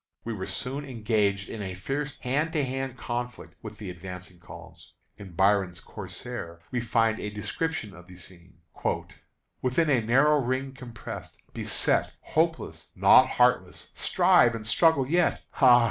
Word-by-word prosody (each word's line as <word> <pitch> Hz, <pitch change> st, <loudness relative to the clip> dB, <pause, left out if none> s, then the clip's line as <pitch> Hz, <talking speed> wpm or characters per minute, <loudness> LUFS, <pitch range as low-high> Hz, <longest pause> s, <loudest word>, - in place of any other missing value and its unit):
We 115 Hz, -, -4 dB
were 95 Hz, -3 st, -5 dB
soon 135 Hz, +3 st, -3 dB
engaged 105 Hz, -6 st, 0 dB
in 110 Hz, -, -6 dB
a 95 Hz, -2 st, -5 dB
fierce 135 Hz, +9 st, -4 dB
hand 150 Hz, +6 st, 0 dB
to 150 Hz, -4 st, +1 dB
hand 130 Hz, 0 st, -4 dB
conflict 120 Hz, 0 st, -5 dB
with 110 Hz, -1 st, -9 dB
the 100 Hz, -4 st, -6 dB
advancing 90 Hz, 0 st, -9 dB
columns. -, -, -13 dB, 0.2 s
In 100 Hz, -4 st, -11 dB
Byron's 95 Hz, -1 st, +2 dB
"Corsair" 85 Hz, 0 st, -8 dB
we 125 Hz, -2 st, -1 dB
find 115 Hz, -1 st, +1 dB
a 105 Hz, -, -3 dB
description 105 Hz, +3 st, -3 dB
of 90 Hz, -1 st, -14 dB
the 90 Hz, -1 st, -13 dB
scene: 90 Hz, -2 st, -13 dB, 1.0 s
"Within 140 Hz, +5 st, +2 dB
a 125 Hz, -4 st, +4 dB
narrow 135 Hz, +7 st, +4 dB
ring 130 Hz, +2 st, -2 dB
compressed, 115 Hz, -8 st, -9 dB, 0.2 s
beset, -, -, 0 dB
Hopeless, 165 Hz, +1 st, -1 dB
not -, -, +7 dB
heartless, -, -, +1 dB
strive 120 Hz, -1 st, +4 dB
and 110 Hz, -1 st, -6 dB
struggle 150 Hz, +3 st, +4 dB
yet, 175 Hz, +4 st, +2 dB, 0.2 s
Ah! 125 Hz, -2 st, +8 dB
115 Hz, 145 wpm, -27 LUFS, 95-135 Hz, 1.0 s, Ah